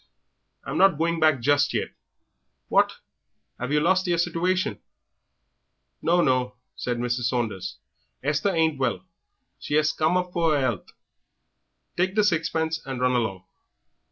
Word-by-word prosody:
"I'm -, -, -3 dB
not 195 Hz, -5 st, +5 dB
going 165 Hz, +1 st, 0 dB
back 155 Hz, -5 st, +3 dB
just 145 Hz, +3 st, +2 dB
yet." -, -, -1 dB, 0.8 s
"What, -, -, +3 dB, 0.7 s
'ave 125 Hz, +4 st, -1 dB
yer 150 Hz, -, +3 dB
lost 185 Hz, +3 st, +2 dB
yer 175 Hz, -1 st, +1 dB
situation?" 180 Hz, +4 st, 0 dB, 1.2 s
"No, 175 Hz, +1 st, +3 dB
no," 125 Hz, -3 st, +1 dB, 0.2 s
said 120 Hz, -1 st, -3 dB
Mrs. 120 Hz, 0 st, -1 dB
Saunders, 115 Hz, -7 st, -2 dB, 0.5 s
"Esther 145 Hz, +7 st, +1 dB
ain't 160 Hz, -5 st, +1 dB
well 130 Hz, +7 st, -1 dB, 0.5 s
she 145 Hz, -, -1 dB
'as 155 Hz, 0 st, +2 dB
come 160 Hz, +3 st, +1 dB
up 180 Hz, 0 st, -3 dB
for 165 Hz, -3 st, +2 dB
'er -, -, +2 dB
'ealth; 120 Hz, -8 st, -2 dB, 1.0 s
take 185 Hz, +2 st, 0 dB
the 210 Hz, -, +4 dB
sixpence 160 Hz, -3 st, 0 dB
and 135 Hz, -2 st, -5 dB
run 125 Hz, 0 st, +2 dB
along." 100 Hz, -6 st, -1 dB
155 Hz, 140 wpm, -25 LUFS, 125-175 Hz, 1.2 s, not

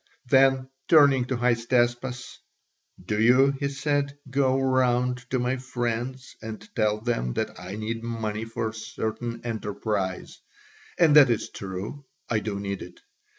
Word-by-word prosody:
Then, 135 Hz, 0 st, +4 dB, 0.2 s
turning 140 Hz, -5 st, +6 dB
to 130 Hz, 0 st, -2 dB
Hystaspas, 120 Hz, +1 st, 0 dB, 0.7 s
"Do 105 Hz, +2 st, 0 dB
you," 130 Hz, +4 st, +5 dB
he 140 Hz, -, 0 dB
said, 140 Hz, 0 st, -1 dB
"go 135 Hz, -1 st, +2 dB
round 125 Hz, -1 st, +2 dB
to 130 Hz, -, 0 dB
my 125 Hz, +1 st, 0 dB
friends 125 Hz, 0 st, -4 dB
and 110 Hz, -, -8 dB
tell 105 Hz, 0 st, +1 dB
them 110 Hz, -, -1 dB
that -, -, -3 dB
I 90 Hz, +2 st, -7 dB
need 110 Hz, +2 st, -4 dB
money 110 Hz, -2 st, -3 dB
for 115 Hz, 0 st, -3 dB
a -, -, -10 dB
certain 110 Hz, +1 st, -4 dB
enterprise 105 Hz, -4 st, -3 dB, 0.6 s
and 160 Hz, -4 st, +5 dB
that 145 Hz, -4 st, +9 dB
is 115 Hz, -, -1 dB
true, 100 Hz, +9 st, -6 dB, 0.2 s
I 110 Hz, -, +1 dB
do 105 Hz, -1 st, -4 dB
need 100 Hz, -1 st, -4 dB
it. -, -, -10 dB
120 Hz, 145 wpm, -26 LUFS, 110-130 Hz, 0.7 s, that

